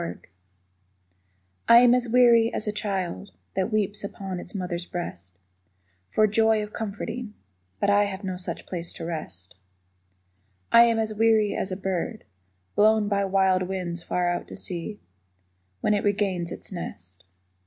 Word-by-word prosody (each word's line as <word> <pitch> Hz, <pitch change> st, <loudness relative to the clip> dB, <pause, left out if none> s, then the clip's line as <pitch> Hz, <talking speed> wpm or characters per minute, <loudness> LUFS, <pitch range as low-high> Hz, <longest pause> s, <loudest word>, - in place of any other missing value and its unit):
A -, -, -2 dB
SONG 85 Hz, +1 st, -6 dB, 1.5 s
I 235 Hz, -, +10 dB
am 245 Hz, -1 st, +6 dB
as 250 Hz, -1 st, +1 dB
weary 235 Hz, -1 st, +5 dB
as -, -, -3 dB
a -, -, +1 dB
child 190 Hz, -, -3 dB, 0.3 s
That 190 Hz, +3 st, 0 dB
weeps 210 Hz, -1 st, 0 dB
upon 195 Hz, -2 st, -5 dB
its 175 Hz, -, -8 dB
mother's 180 Hz, -2 st, -3 dB
breast 90 Hz, -, -6 dB, 0.8 s
For 215 Hz, -, +3 dB
joy 220 Hz, +1 st, +3 dB
of 210 Hz, -, -9 dB
comforting. 220 Hz, +1 st, -5 dB, 0.4 s
But 200 Hz, -, +2 dB
I 205 Hz, 0 st, +4 dB
Have 200 Hz, 0 st, -6 dB
no 185 Hz, -1 st, -3 dB
such 180 Hz, 0 st, -6 dB
place 170 Hz, -2 st, -5 dB
to 165 Hz, -, -7 dB
rest. 95 Hz, -, -6 dB, 1.2 s
I 235 Hz, 0 st, +8 dB
am 230 Hz, -1 st, +2 dB
as 220 Hz, -1 st, -1 dB
weary 220 Hz, -1 st, +3 dB
as 190 Hz, -, -2 dB
a 185 Hz, -, -3 dB
bird 195 Hz, +4 st, -3 dB, 0.5 s
Blown 215 Hz, 0 st, +4 dB
by 200 Hz, -1 st, +1 dB
wild 190 Hz, -1 st, +3 dB
winds 180 Hz, -2 st, -3 dB
far 175 Hz, +1 st, -1 dB
out 175 Hz, 0 st, -2 dB
to -, -, -9 dB
sea 185 Hz, +4 st, -5 dB, 0.8 s
When 210 Hz, -, +2 dB
it 205 Hz, -, 0 dB
regains 195 Hz, -4 st, 0 dB
its -, -, -7 dB
nest. 90 Hz, -, -8 dB
200 Hz, 160 wpm, -25 LUFS, 180-215 Hz, 1.5 s, I